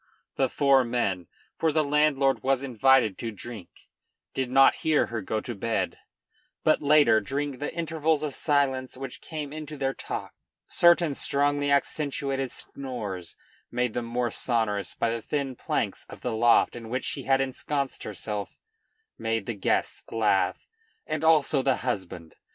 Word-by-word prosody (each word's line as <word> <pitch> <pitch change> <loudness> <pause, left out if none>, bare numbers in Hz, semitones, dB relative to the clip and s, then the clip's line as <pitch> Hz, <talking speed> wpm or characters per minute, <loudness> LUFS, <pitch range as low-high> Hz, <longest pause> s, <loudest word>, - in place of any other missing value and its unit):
The 135 -1 +1
four 135 -1 +4
men, 100 -8 -1 0.3
for 160 - +2
the 155 +1 +2
landlord 145 -2 +2
was 135 0 +1
invited 130 -4 +3
to 115 - -3
drink, 110 -3 -8 0.6
did 130 -2 -2
not 135 +1 +6
hear 155 -2 +2
her 110 - -1
go 110 +3 -2
to 120 - -5
bed, 115 +2 -2 0.6
but 155 - +3
later, 145 -6 +5
during 140 +4 -3
the 145 - -3
intervals 160 -2 0
of 150 -3 -2
silence 135 -4 +1
which 135 -1 -7
came 150 -3 -6
into 155 -1 -7
their 135 -1 0
talk, - - -6 0.3
certain 170 -3 +4
strongly 145 +1 +1
accentuated 140 -2 0
snores, 105 -10 -6 0.3
made 125 -1 -1
the 120 - -1
more 120 0 -2
sonorous 105 -6 -1
by 115 - 0
the 115 0 -3
thin 140 0 -2
planks - - -2
of - - -11
the 125 - -2
loft 120 +1 +4
in 115 -2 -8
which 130 +2 -2
she - - -4
had 135 0 +3
ensconced 135 +1 -2
herself, 105 0 -5 0.6
made 115 -2 -1
the 120 - -3
guests 100 - -1
laugh 105 -4 +1 0.4
and 155 0 -3
also 155 -3 +4
the 135 -1 +2
husband. 90 -8 -4
135 Hz, 155 wpm, -27 LUFS, 115-145 Hz, 0.6 s, not